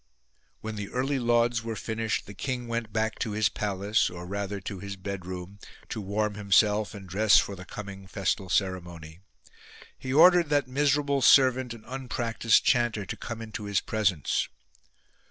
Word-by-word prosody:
When 110 -1 -5
the 100 -1 -5
early 135 +2 -1
lauds 120 -1 +2
were 115 -1 -4
finished, 110 +1 -2
the 100 - -10
king 125 +3 -4
went 115 -1 -3
back 110 0 -1
to 110 -4 -2
his 105 -2 +2
palace, 100 +1 0
or 90 0 -8
rather 100 +1 -4
to 95 +1 -6
his 100 +1 -6
bedroom, 95 0 -7 0.3
to 110 - -4
warm 105 +2 -1
himself 105 +1 +2
and 95 -2 -10
dress 100 +4 +4
for 100 - +1
the 90 0 -10
coming 100 -1 -8
festal 95 -1 -2
ceremony. 90 -4 -2 0.8
He 130 - -5
ordered 170 +2 +6
that 145 -3 +2
miserable 140 +1 +1
servant 130 -1 +5
and 115 -2 -9
unpractised 120 -3 +1
chanter 120 -4 +2
to - - -5
come 115 -1 -6
into 110 -1 -7
his 100 -2 +1
presence. 100 -9 0
110 Hz, 160 wpm, -27 LUFS, 100-120 Hz, 0.8 s, ordered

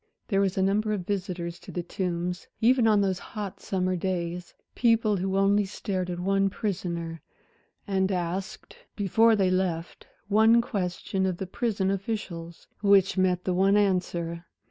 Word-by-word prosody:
There 195 -3 +2
was 195 -1 0
a 190 - +3
number 210 +2 +1
of 190 -4 -3
visitors 180 -3 -3
to - - -11
The 175 - -3
Tombs, 180 0 -3
even 240 0 +4
on 210 -2 +4
those 190 -2 0
hot 205 -3 -7
summer 185 -1 -1
days; 175 -1 -3 0.2
people 230 -3 +3
who 190 +1 -1
only 200 +1 +4
stared 190 -2 -3
at 175 -1 -4
one 195 +2 +2
prisoner 170 -5 -4 0.6
and 190 -1 +1
asked 180 +1 -4 0.2
before 220 +3 +4
they 190 -3 +2
left 180 -3 -2 0.2
one 220 +3 +5
question 190 -3 -2
of 185 -2 -2
the 190 - -4
prison 195 -1 -1
officials, 190 -5 -5 0.2
which 200 -2 +4
met 185 -1 +1
the 185 - 0
one 195 +3 +4
answer. 175 -4 0
190 Hz, 155 wpm, -27 LUFS, 180-205 Hz, 0.6 s, one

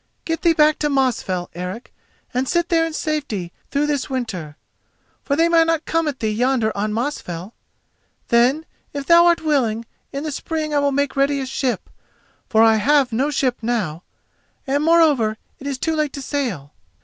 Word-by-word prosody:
Get 325 0 -2
thee 340 -2 +4
back 305 -1 +4
to 295 - 0
Mosfell, 245 -10 0
Eric, 180 +7 -7 0.4
and 255 +1 -1
sit 345 0 +1
there 330 -2 +3
in 325 - -7
safety 285 - -3 0.2
through 285 +1 +1
this 290 -3 -1
winter, 190 - -4 0.7
for 280 - 0
they 330 +3 +3
may 335 -1 +5
not 325 -1 0
come 330 -1 0
at 280 -4 -4
thee 220 -1 0
yonder 235 0 +1
on 210 +1 -1
Mosfell. 215 - -4 0.8
Then, 250 +7 +3 0.3
if 280 -1 -4
thou 340 +2 +6
art 340 -1 +3
willing, 235 -7 +1 0.3
in 275 +1 -4
the 310 - -3
spring 310 +1 -3
I 290 - +3
will 285 0 +2
make 280 0 0
ready 275 +1 +2
a 265 - -3
ship, 260 -1 -2 0.6
for 220 0 +5
I 225 -1 +5
have 270 +1 +3
no 265 +6 +1
ship 260 -4 0
now, 215 -9 -2 0.6
and, 280 +2 0
moreover, 300 -10 +4 0.2
it 280 - -7
is 275 -2 -2
too 320 +4 -1
late 305 -2 -1
to 280 - -6
sail. 235 - -3
275 Hz, 185 wpm, -21 LUFS, 225-305 Hz, 0.8 s, thou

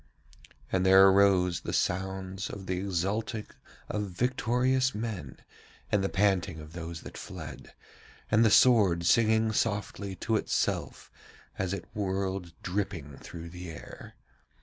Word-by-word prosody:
And 95 -1 +2
there 95 +1 +8
arose 95 -3 +4
the - - -5
sounds 95 +1 -2
of 100 -1 -7
the 90 -1 -2
exulting 100 +4 -2 0.4
of 105 -1 -3
victorious 125 +4 +1
men, 105 - -5 0.5
and 100 -2 +2
the 95 - 0
panting 95 -4 +1
of 75 +1 -11
those 85 -1 -6
that - - -9
fled, - - -9 0.6
and 110 +2 +5
the 110 - +5
sword 100 -8 +5
singing 110 +3 +4
softly 100 -2 -2
to 110 +5 0
itself - - -2 0.5
as 95 -2 -1
it 95 -3 -4
whirled 95 -3 -2
dripping 90 -7 -3
through 85 -1 -9
the 90 0 -8
air. 80 +1 -10
95 Hz, 130 wpm, -29 LUFS, 90-105 Hz, 0.6 s, there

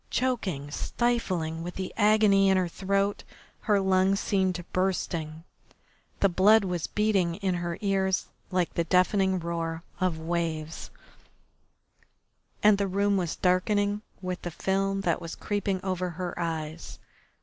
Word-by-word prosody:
Choking, 190 - -1
stifling 185 -9 -1
with 175 +1 -6
the 190 -1 -4
agony 210 -2 +4
in 190 - +4
her 185 -1 +1
throat, 195 +3 -1 0.4
her 210 -3 +2
lungs 190 0 +3
seemed 185 -3 0
bursting, 170 -4 -1 0.8
the 200 - +6
blood 200 +4 +5
was 180 -4 -2
beating 195 -5 +1
in 195 -1 -1
her 175 -1 -3
ears 195 -2 +1 0.2
like 180 -2 0
the 170 - +1
deafening 190 +2 +2
roar 165 -1 -3 0.2
of 185 -3 0
waves, 160 -1 -3 1.7
and 210 -1 +6
the 200 - +1
room 200 +2 +1
was 175 -4 -1
darkening 205 +3 +1 0.2
with 185 0 -3
the 175 - -4
film 195 +3 -1
that 175 -4 0
was 165 0 -6
creeping 200 -2 -2
over 185 -1 -1
her 175 +1 -5
eyes. 160 -2 -4
185 Hz, 135 wpm, -27 LUFS, 170-200 Hz, 1.7 s, the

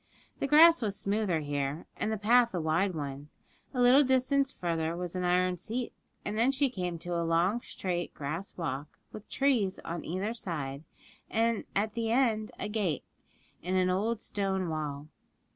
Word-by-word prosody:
The - - 0
grass 325 +3 +7
was 205 -3 -1
smoother 200 -5 0
here, 145 +1 -2
and 215 - -2
the 220 - -1
path 235 +1 +4
a - - 0
wide 165 +4 +1
one; 145 -1 -5 0.4
a 255 - -4
little 250 +4 +7
distance 265 +1 +2
farther 165 -1 -2
was 180 0 -5
an 180 - -1
iron 180 0 +2
seat, 235 +7 -4 0.3
and 205 - -2
then 235 +4 +3
she 275 -1 +1
came 180 -5 -3
to 175 +1 -5
a 170 - 0
long, 170 +7 +2
straight 175 -5 -3
grass 155 +7 -5
walk, 145 -3 -4
with 215 - -10
trees 245 -9 +1
on 170 0 -4
either 190 +6 -2
side, 150 - -4 0.4
and 230 -1 +1
at 210 +2 0
the 225 -1 -1
end 230 -4 +2
a - - -3
gate, 205 -9 -1 0.6
in 180 +3 -2
an 185 0 +3
old 215 +4 0
stone 190 -3 -1
wall. 150 -2 -4
190 Hz, 175 wpm, -30 LUFS, 165-230 Hz, 0.6 s, grass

